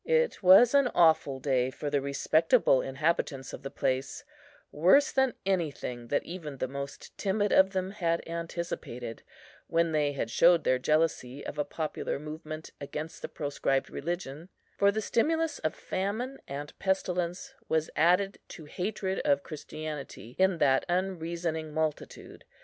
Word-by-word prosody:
It 485 0 +1
was 195 +7 +8
an 280 -2 +5
awful 160 -5 +4
day 130 -2 +1
for 145 +2 -5
the 145 -1 +2
respectable 140 0 +3
inhabitants 135 -1 -1
of - - -7
the 135 - -5
place; 130 0 -2 0.5
worse 185 - +5
than 265 -2 +2
anything 150 -10 -2
that 145 - 0
even 160 -5 -7
the 130 - -2
most 140 +1 -7
timid 205 +1 +1
of 190 0 +6
them 185 0 -1
had 170 -5 -1
anticipated, 165 -8 -5 0.5
when 165 0 +1
they 150 -2 +1
had 135 -4 -3
showed 170 +3 +5
their 130 - +2
jealousy 145 -2 0
of 150 - -6
a - - +3
popular 155 0 -3
movement 155 +1 -7
against 150 +3 -6
the - - -5
proscribed 140 -2 -1
religion; 165 0 -5 0.3
for 200 0 +4
the 220 +2 -2
stimulus 320 +9 +1
of 155 - -2
famine 220 +8 -3
and 145 +2 -6
pestilence 185 +5 -1 0.2
was 160 -1 0
added 180 +4 +3
to 160 - -10
hatred 190 +4 -3
of 285 -1 +2
Christianity, 150 -5 -7
in 190 -1 +4
that 135 -3 +3
unreasoning 170 -3 -2
multitude. 155 -2 -4
160 Hz, 145 wpm, -29 LUFS, 145-190 Hz, 0.5 s, was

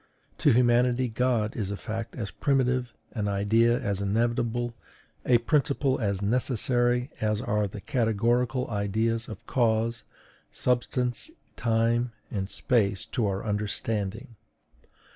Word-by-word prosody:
To - - +5
humanity 125 +1 +3
God 115 -2 0
is 100 -4 -2
a 100 - -3
fact 115 +1 -5
as 105 -5 -4
primitive, 125 -3 +1 0.2
an 105 -3 -2
idea 110 +4 +3
as 100 -1 -2
inevitable, 120 +3 0 0.5
a 125 - +6
principle 140 +1 +1
as 100 -3 -1
necessary 120 +2 +2
as 105 -1 +1
are 105 -4 0
the 100 +1 -8
categorical 120 +2 +1
ideas 110 +3 0
of 110 - -9
cause, 115 -2 +1 0.5
substance, 125 - -1 0.3
time, 115 +1 +1 0.2
and 95 -2 -3
space 100 -7 0
to 115 -5 +1
our 95 +1 -2
understanding. 105 +2 -3
115 Hz, 120 wpm, -27 LUFS, 105-125 Hz, 0.5 s, a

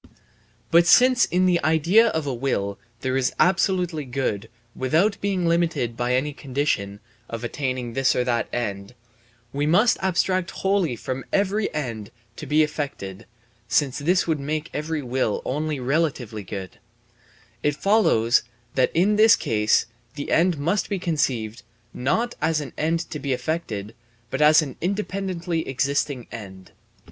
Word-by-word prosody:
But 170 +1 +5
since 250 0 +6
in 185 +1 +1
the 180 -2 +2
idea 165 +9 +4
of 160 -8 -1
a 140 - -2
will 110 -6 -2 0.2
that 130 -1 -1
is 130 -1 +1
absolutely 180 -3 +2
good 125 -5 -3 0.3
without 165 +11 +1
being 195 -3 0
limited 165 -8 +1
by 120 +1 0
any 145 +3 -1
condition 130 -8 -2 0.3
(of 115 0 -6
attaining 125 -1 -3
this 135 +1 +2
or 125 - +2
that 120 -2 0
end) 100 -2 -4 0.6
we 145 +1 0
must 210 +9 +4
abstract 185 -1 +1
wholly 190 -9 0
from 130 +3 -5
every 200 +1 +1
end 115 -8 -4 0.3
to 155 - -7
be 150 +2 +4
effected 140 -10 -5 0.4
(since 140 0 +1
this 180 +6 +2
would 160 -3 0
make 155 +3 -3
every 150 0 -3
will 125 -4 -1
only 150 +2 -2
relatively 130 -5 -1
good), 95 -1 -8 0.8
it 145 -1 +1
follows 145 - +3 0.3
that 130 - +2
in 200 +5 +3
this 220 0 +7
case 105 -1 +1 0.3
the 145 - -5
end 170 0 +3
must 170 +8 0
be 200 - -1
conceived, 130 - -1 0.3
not 225 - 0
as 160 -1 +1
an 145 -3 -7
end 165 +2 0
to 150 - -4
be 140 -1 -1
effected, 125 -6 -3 0.4
but - - -2
as 155 +1 +6
an 135 -4 -8
independently 185 -3 -2
existing 135 -1 -1
end. 95 -4 -10
150 Hz, 150 wpm, -23 LUFS, 125-175 Hz, 0.8 s, this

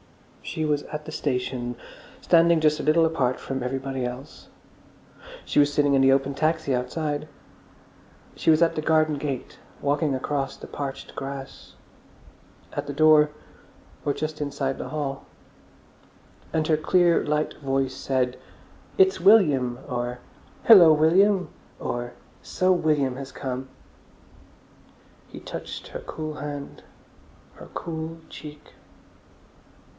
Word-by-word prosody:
She 155 - -3
was 150 -1 +1
at 150 0 -5
the 155 - -7
station, 125 -4 -2 0.5
standing 170 -1 +4
just 155 -1 +2
a - - -3
little 160 +2 +4
apart 135 -6 0
from 135 -1 -4
everybody 135 +1 -3
else; 125 +4 -7 1.0
she - - +1
was 145 0 +4
sitting 145 -1 +2
in 135 - +4
the 135 0 +5
open 135 +1 +2
taxi 155 0 0
outside; 145 +4 -3 1.1
she - - 0
was 155 +1 +5
at 165 - +1
the 155 - -1
garden 155 -1 +2
gate; 140 -3 -5 0.2
walking 145 0 0
across 135 +1 -2
the - - -10
parched 140 -2 -6
grass; 135 0 -8 1.0
at - - -4
the - - -3
door, 150 +1 +5 0.7
or 145 - +1
just 155 0 -4
inside 140 -2 -2
the - - -5
hall. 140 -3 -4 1.3
And 160 -1 0
her 155 - +3
clear, 175 +2 +3
light 150 +1 -1
voice 135 -1 0
said, 130 -2 -1 0.6
"It's 385 0 +4
William," 140 - +4
or 120 0 -3 0.4
"Hillo, 185 -8 +9
William!" 180 +6 +4 0.3
or 120 0 -4 0.3
"So 185 0 +1
William 150 -7 +1
has 135 0 -7
come!" 130 0 -5 1.6
He - - -9
touched - - -7
her - - -6
cool 155 -1 -6
hand, 145 -1 -7 0.7
her - - -13
cool 160 0 -5
cheek. 150 -1 -11
145 Hz, 130 wpm, -25 LUFS, 135-155 Hz, 1.6 s, Hillo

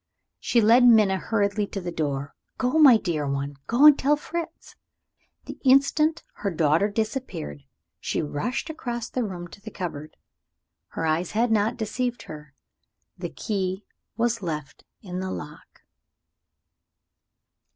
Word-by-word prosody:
She 235 - +2
led 230 +4 +6
Minna 215 -5 +6
hurriedly 205 0 0
to 195 - -5
the 175 -2 -5
door. 145 -4 -3 0.2
"Go, 255 +5 +1
my 270 -7 +8
dear 160 -8 -2
one 140 +1 -3
go 245 +6 +4
and 300 -2 +8
tell 290 +3 +3
Fritz!" 330 +2 -7 0.7
The - - -9
instant 280 +4 +3
her 200 - -2
daughter 165 +3 +2
disappeared, 215 - -4 0.4
she - - -2
rushed 245 - -3
across 240 -7 -5
the 250 - -1
room 180 -4 -6
to 200 - -14
the 220 - -8
cupboard. 155 -6 -7 0.7
Her 165 - -4
eyes 160 +2 0
had 230 +2 +1
not 215 +1 +1
deceived 245 +2 -3
her. 150 -2 -11 0.6
The - - -4
key 190 -2 -3 0.3
was 230 -1 0
left 150 -5 -5 0.2
in 180 -2 -5
the 185 0 -3
lock. 150 -3 -9
205 Hz, 140 wpm, -25 LUFS, 160-245 Hz, 0.7 s, my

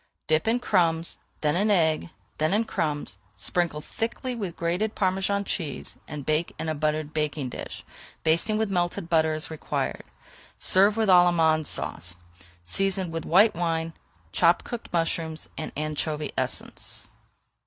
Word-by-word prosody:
Dip 155 +5 +2
in 235 +2 +3
crumbs, 170 -7 +1 0.2
then 150 0 +2
in 205 +4 +2
egg, 160 -5 +2 0.3
then 155 +6 +2
in 225 +2 +2
crumbs, 145 - -2 0.2
sprinkle 170 -4 0
thickly 240 - -3
with 200 -8 -4
grated 180 +6 0
Parmesan 195 +1 +1
cheese, 160 -8 -4
and 145 -2 -6
bake 155 +2 0
in - - -4
a 155 - 0
buttered 155 0 -1
baking 150 -3 -1
dish, - - -7 0.4
basting 170 +7 +2
with 220 -2 0
melted 175 -2 -1
butter 160 -1 +3
as 155 +1 -4
required. 160 - -3 0.5
Serve 200 +3 +4
with 220 -1 +2
Allemande 170 -4 +5
Sauce, 90 0 -4 0.5
seasoned 190 - 0
with 165 -1 -3
white 205 +6 +6
wine, 165 -1 -1 0.4
chopped - - +3
cooked 240 -3 -6
mushrooms, 165 -2 -1
and 155 - -5
anchovy 155 0 -2
essence. - - -2
165 Hz, 145 wpm, -26 LUFS, 155-195 Hz, 0.5 s, white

